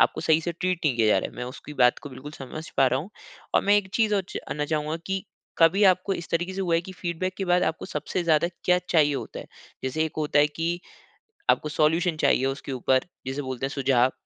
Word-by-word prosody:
आपको - - +3
सही 160 0 +3
से 170 +1 -3
ट्रीट 180 +1 -1
नहीं 140 -5 +2
किया 115 -2 +3
जा - - +5
रहा - - -3
है। - - -17
मैं 125 - -4
उसकी 130 +4 -9
बात 125 0 +5
को 145 - -7
बिल्कुल 135 +3 -9
समझ 155 +2 -8
पा 135 - +5
रहा 130 0 +2
हूँ 175 +7 -9 0.4
और - - +5
मैं 205 +1 +5
एक 200 -2 0
चीज़ 220 -2 +3
और 200 - +2
जानना 150 0 -3
चाहूँगा 155 +1 -1
कि 190 0 -2 0.3
कभी 165 +5 +5
आपको 185 +1 +3
इस 170 - -6
तरीक़े 175 +3 0
से 195 - -3
हुआ 175 -3 +1
है 165 - +3
कि 190 +2 -10
फ़ीडबैक 180 +1 -3
के 195 - -1
बाद 180 0 +3
आपको 160 - -1
सबसे 185 -2 -3
ज़्यादा 160 0 +3 0.2
क्या 180 0 +4
चाहिए 150 -4 +4
होता - - -5
है, - - -11 0.4
जैसे 130 +5 0
एक 160 - -4
होता 150 -1 +1
है 145 - +6
कि, 165 +3 -3 0.7
आपको 150 - +3
सॉल्यूशन 160 +2 +2
चाहिए 130 - +3
उसके 135 +1 -3
ऊपर, 130 +2 +1 0.2
जिसे 135 +2 -2
बोलते 130 -1 -4
हैं - - -2
सुझाव। 130 -2 +2
160 Hz, 245 wpm, -26 LUFS, 135-180 Hz, 0.7 s, है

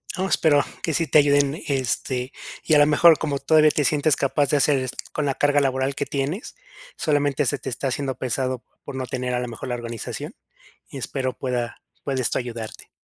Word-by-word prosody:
No, 190 0 -1
espero 150 -6 +3 0.2
que 160 - -1
sí 165 +3 +1
te 155 - +6
ayuden, 145 +1 +3
este 130 -1 -1 0.3
y 155 - +1
a 150 - +7
la 145 - +7
mejor, 160 +2 +6
como 145 -3 -1
todavía 155 +2 +5
te 150 - 0
sientes 150 +1 +3
capaz 140 +1 +1
de 145 - +3
hacer 140 0 +3
es 130 -1 -3 0.2
con 150 - -2
la 135 -2 0
carga 145 0 +3
laboral 135 0 0
que 140 - -2
tienes, 145 - -3 0.4
solamente 145 -2 +1
se 135 +3 0
te 135 - -5
está 130 +3 -2
haciendo 135 0 -2
pesado 130 0 -2 0.2
por 140 - -8
no 130 -1 -3
tener 125 0 -3
a - - 0
la 125 - -3
mejor 115 +2 -7
la 125 - -1
organización, 120 -2 -6 0.6
y 140 - -8
espero 130 0 -3
pueda 125 -2 -3 0.2
pueda 135 -2 -1
esto - - 0
ayudarte. 115 -3 -6
140 Hz, 205 wpm, -23 LUFS, 130-145 Hz, 0.6 s, a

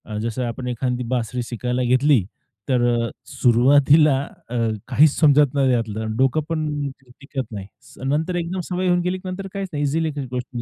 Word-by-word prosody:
अ, 105 -1 -6
जसं 115 +3 -3
आपण 125 +2 -5
एखादी 125 0 -2
बासरी 125 0 -2
शिकायला 125 +1 -2
घेतली, 130 -1 +3 0.5
तर 125 -2 +2 0.3
अ, - - -6 0.2
सुरुवातीला 140 +4 +4 0.3
अ, 125 - -5 0.3
काहीच 150 +2 +5
समजत 145 -3 +5
नाही 135 -2 +2
त्यातलं, 110 -3 -1
अन् 110 0 -3
डोकं 135 +4 +2
पण 150 -3 -2 0.3
टिकत 140 -1 -5
नाही. 100 -3 -7 0.3
स - - -19
नंतर 155 +6 0
एकदम 175 +2 -2
सवय 185 0 -1
होऊन 175 0 +3
गेली, 180 +1 -1
की 185 0 -10
नंतर 195 +1 -5
काहीच 195 -1 -4
नाही 145 0 -1
ईझीली 160 +3 0
ती 140 -2 -4
गोष्ट 125 0 -3
135 Hz, 185 wpm, -22 LUFS, 125-155 Hz, 0.5 s, काहीच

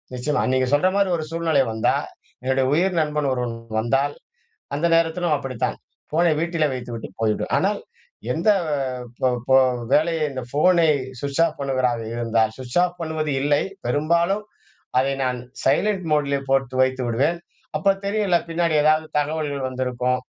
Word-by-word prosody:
நிச்சயமா. 145 +4 0
நீங்க 130 0 +2
சொல்ற 150 +6 +4
மாரி 200 -2 +2
ஒரு 155 - -3
சூழ்நிலை 165 -4 +2
வந்தா, 110 0 +1 0.5
என்னுடைய 130 0 +1
உயிர் 185 +4 +2
நண்பன் 150 -2 0
ஒருவன் 125 -2 -2 0.2
வந்தால், 135 +5 +1 0.6
அந்த 165 +4 +1
நேரத்திலும் 165 0 +1
அப்படித்தான் 130 -4 -3 0.3
ஃபோனை 170 +2 +3
வீட்டிலே 165 -2 +1
வைத்துவிட்டு 120 -2 -6
போய்விடுவேன். 110 -1 0
ஆனால் - - 0 0.5
எந்த 170 +10 +2 0.7
ப் - - +4 0.2
போ 130 - +6 0.4
வேலையை 160 0 +2
இந்த 130 -1 -4
ஃபோனை 165 +4 +4 0.3
ஸ்விட்ச் 140 +3 0
ஆஃப் 160 - -6
பண்ணுவதாக 130 -3 0
இருந்தால், 115 -2 +1
ஸ்விட்ச் 125 +3 -2
ஆஃப் 180 0 -4
பண்ணுவது 160 -2 -2
இல்லை. 145 +1 +2 0.2
பெரும்பாலும் 170 +9 +1 0.6
அதை 135 +1 0
நான் 125 -1 -1 0.2
சைலன்ட் 185 +7 +1
மோடுல 140 -2 +2
போட்டு 135 -1 +1
வைத்து 130 0 0
விடுவேன். 145 +9 +1 0.4
அப்ப 195 +6 +3
தெரியும்ல 200 -3 +1
பின்னாடி 165 -1 0
ஏதாவது 155 +1 +3
தகவல்கள் 145 -2 -2
வந்திருக்கும், 125 0 -1
145 Hz, 140 wpm, -22 LUFS, 130-165 Hz, 0.7 s, போ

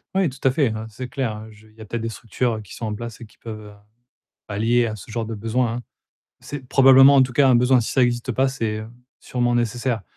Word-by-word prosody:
Oui, 190 -4 +2
tout 135 +1 -13
à - - +4
fait, 140 +1 +2
hein. 110 +1 -5
C'est 125 +4 -7
clair. 110 -4 -4
Je 105 0 -18
il 110 - -23
y 110 - -14
a - - -8
peut-être 115 +2 -4
des 115 - -2
structures, 115 +2 -2
heu, 110 - -6
qui 105 - -12
sont 115 - -5
en 105 - -3
place 115 +1 -7
et 120 - -9
qui 110 - -23
peuvent, 110 -2 -7
heu, - - -13 0.8
allier 115 +4 +1
à 110 -2 -3
ce 105 - -12
genre 115 0 -3
de 115 - -5
besoin, 115 +3 -1
hein. 120 - -7 0.6
C'est 145 -2 -8
probablement, 135 +1 +7
en 135 - +6
tout 130 -1 0
cas, 135 +2 +4
un 125 - +5
besoin 125 +1 +4
si 110 - -4
ça 130 - +2
existe 120 +1 -1
pas, 130 +3 +1
c'est, 115 -5 -2
heu, 110 - -7 0.3
sûrement 120 -1 -1
nécessaire. 120 0 -1
120 Hz, 265 wpm, -22 LUFS, 110-130 Hz, 0.8 s, probablement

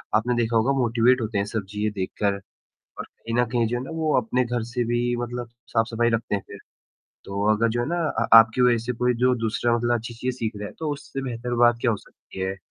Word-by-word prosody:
आपने 120 +3 +2
देखा 115 -1 +1
होगा 115 +5 +2
मोटीवेट 120 +1 +3
होते 110 -2 -2
हैं 100 - +1
सब 105 -1 -4
चीज़ें 105 +1 -2
देखकर 100 +1 -1 0.7
और - - -4
कहीं 115 0 -7
न - - +2
कहीं 120 -2 +2
जो 120 +2 -1
है 125 - -4
ना 135 - -8
वो 155 -1 +1
अपने 125 +3 0
घर 120 -1 -2
से 125 -1 0
भी 120 +1 0
मतलब 120 0 -4 0.2
साफ़-सफ़ाई 115 +1 +1
रखते 115 -2 -1
हैं 100 - -3
फिर, 100 - -10 0.7
तो 100 +1 -3
अगर 115 +2 +1
जो 120 +1 -1
है 120 - -1
ना 170 - -1 0.2
अ, 115 - +1
आपकी 115 +2 +4
वज़ह 120 -1 +4
से 125 - 0
कोई 125 +1 +1
जो 125 0 +4
दूसरा 120 +2 +1
मतलब 120 +1 +1
अच्छी 120 +1 -7
चीज़ें 125 +2 -3
सीख 115 -2 -2
रहा 105 0 -5
है, - - -12
तो 160 -2 -2
उससे 140 -1 -6
बेहतर 120 -1 -4
बात 120 0 +4
क्या 120 - +2
हो 110 - 0
सकती 95 - -13
है? 95 +1 -2
120 Hz, 245 wpm, -24 LUFS, 110-125 Hz, 0.7 s, आपकी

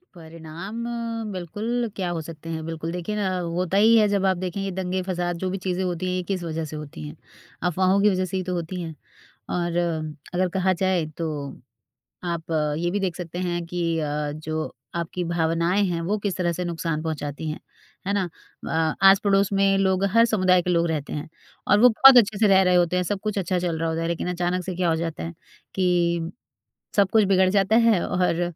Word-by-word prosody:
परिणाम 165 +6 -8 0.5
बिल्कुल 215 +7 -3
क्या 185 -3 -2
हो 165 -2 -3
सकते 165 0 -9
हैं 160 -1 -4
बिल्कुल 165 0 -4
देखिए 180 +4 -4
ना 190 -3 -1
होता 180 +2 -1
ही 220 +3 +6
है 215 -1 +5
जब 200 -1 +1
आप 190 -2 +2
देखें 185 +1 -4
ये 195 -1 -2
दंगे-फ़साद 180 -1 -2
जो 185 - 0
भी 190 - -2
चीज़ें 185 0 0
होती 180 0 -2
हैं 180 - -1
ये 185 - -2
किस 185 -2 -2
वजह 160 -1 -3
से - - -6
होती 145 - -7
हैं? 75 - -9 0.5
अफ़वाहों 185 +3 +2
की 210 - +5
वजह 185 -1 0
से 185 +1 -3
ही 185 - -2
तो 180 0 -3
होती 175 +1 -4
हैं। 160 -2 -6 0.5
और 175 -1 -1 0.6
अगर 180 +1 +1
कहा 190 +1 +1
जाए 185 -3 +2
तो 165 - -2 1.1
आप 165 -1 -5 0.3
ये 175 +1 0
भी 205 - -1
देख 185 -3 -2
सकते 175 -1 -6
हैं 175 -1 -2
कि 170 -1 -1
अ, 150 -1 -2
जो 155 +1 -4 0.2
आपकी 170 +1 -3
भावनाएँ 170 +3 +1
हैं 170 -1 -1
वो 210 +1 +1
किस 200 -3 -1
तरह 175 -2 0
से 180 +2 -3
नुक़सान 165 -2 -2
पहुँचाती 155 -1 -4
हैं। 155 - -6 0.5
है 200 - 0
ना? 195 -3 0 0.4
अ, 160 0 +1
आस-पड़ोस 195 +1 +4
में 195 0 +3
लोग 190 0 +2
हर 230 0 +7
समुदाय 185 -5 +3
के 180 - -2
लोग 170 -1 +2
रहते 150 -3 -3
हैं 150 - -5 0.4
और 205 - +5
वो 250 - +9
बहुत 260 +3 +8
अच्छे 210 -2 +3
से 215 - +4
रह 190 -1 +6
रहे 180 -1 +3
होते 175 0 +2
हैं 180 - +2
सब 200 - -3
कुछ 210 -2 -2
अच्छा 185 -1 0
चल 175 -2 -1
रहा 165 +1 -1
होता 165 0 -2
है 165 - -1
लेकिन 170 +1 -2
अचानक 180 +1 -1
से 185 - -4
क्या 180 -1 +1
हो 160 - +1
जाता 165 - -4
है 85 - -5 0.4
कि 170 -2 +1 0.7
सब 200 -2 +4
कुछ 220 -1 +5
बिगड़ 190 -1 +4
जाता 195 +2 +2
है 220 -6 +4
और 180 -1 +1
180 Hz, 215 wpm, -24 LUFS, 165-190 Hz, 1.1 s, वो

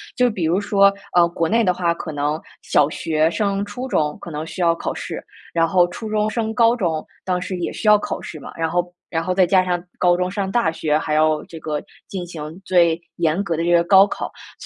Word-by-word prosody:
就 250 -1 +3
比 195 -7 -4
如 175 +5 +2
说， 200 -1 +4 0.2
呃， 175 -1 +6
国 170 -1 -1
内 230 +2 +3
的 180 -3 +3
话 170 -1 0
可 165 - -6
能 150 +1 -1 0.2
小 145 -1 +3
学 155 0 +1
升 200 -1 -1
初 245 +6 -6
中 150 -10 0
可 - - -8
能 155 0 -4
需 180 - -6
要 170 -1 +3
考 - - -3
试， - - -6 0.3
然 165 -1 +2
后 175 0 +4
初 220 +5 -7
中 215 0 +1
升 220 0 -2
高 230 0 +4
中 165 -9 -1 0.2
当 180 -1 0
时 185 +1 -4
也 175 - -3
需 215 - -4
要 210 - +8
考 205 - -4
试 155 - -8
嘛， 135 - -9
然 165 -1 -1
后 175 +1 -1 0.2
然 165 -1 -1
后 185 - -1
再 185 -1 +4
加 185 0 +4
上 175 -1 -1
高 175 -1 +4
中 180 0 -1
上 195 0 -3
大 200 -7 +2
学， 155 -2 0
还 155 0 0
要 155 0 +2
这 165 - -10
个 150 -1 -3 0.3
进 190 -2 -5
行 160 +1 -8
最 170 -3 +3
严 170 +3 +1
格 170 -4 -2
的 165 - -1
这 170 - +1
个 170 0 +5
高 190 +3 +7
考， - - -5 0.2
所 - - -16
175 Hz, 260 characters per minute, -21 LUFS, 160-195 Hz, 0.3 s, 要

